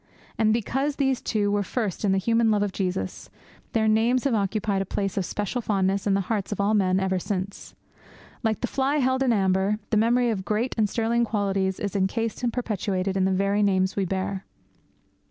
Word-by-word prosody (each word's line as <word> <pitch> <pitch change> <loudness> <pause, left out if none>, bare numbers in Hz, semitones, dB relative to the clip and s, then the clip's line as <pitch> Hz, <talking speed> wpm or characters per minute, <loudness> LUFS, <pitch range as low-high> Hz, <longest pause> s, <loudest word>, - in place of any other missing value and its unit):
And 220 -1 +2
because 270 +6 0
those 270 -3 +1
two 205 -2 0
were 205 0 +1
first 205 -2 -3
in 200 - +2
the 195 - +2
human 230 +3 +2
love 210 -1 +2
of 205 - -1
Jesus, 180 - -3 0.4
their 220 -1 +2
names 230 +3 +3
have 275 - +1
occupied 200 -1 0
a - - +1
place 195 -1 -2
of 195 - -1
special 210 +7 -3
fondness 195 -2 0
in 195 - +3
the 195 - +2
hearts 200 +1 -2
of 205 - -3
all 200 +2 +2
men 190 -3 +2
ever 190 -1 0
since. 195 +1 -5 0.7
Like 220 -3 -1
the - - +1
fly 270 +3 0
held 260 -1 +1
in 265 - +2
the 235 - +4
amber, 190 +1 +2
the 215 - +3
memory 240 +2 +3
of 195 -4 -3
great 215 +6 -1
and 215 -3 +1
sterling 235 +1 +1
qualities 195 -4 0
is 200 -2 -3
encased 215 +4 -1
and 240 -1 0
perpetuated 200 -5 -2
in 190 -1 +2
the 190 - +2
very 200 +2 +1
names 190 -2 +2
we 195 - 0
bear. 190 +1 -3
205 Hz, 210 wpm, -25 LUFS, 195-230 Hz, 0.7 s, the